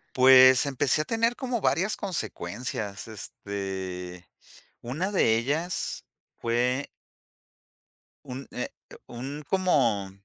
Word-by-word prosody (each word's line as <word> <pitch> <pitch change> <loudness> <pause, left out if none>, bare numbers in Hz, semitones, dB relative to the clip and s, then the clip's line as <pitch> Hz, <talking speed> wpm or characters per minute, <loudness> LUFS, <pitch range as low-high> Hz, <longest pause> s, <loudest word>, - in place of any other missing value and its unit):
Pues, 130 0 +8
empecé 140 +1 +1
a - - -21
tener 230 +1 +1
como 250 -4 -2
varias 190 +4 +1
consecuencias. 110 - -4
Este, 95 -4 -6 0.5
una 155 +12 -3
de 115 - +3
ellas 155 +9 -2 0.3
fue 125 +4 0 1.4
Un 130 +2 -7
eh, 125 - -4 0.4
un 135 +5 -6
como, 125 - +2
130 Hz, 95 wpm, -27 LUFS, 105-160 Hz, 1.4 s, Pues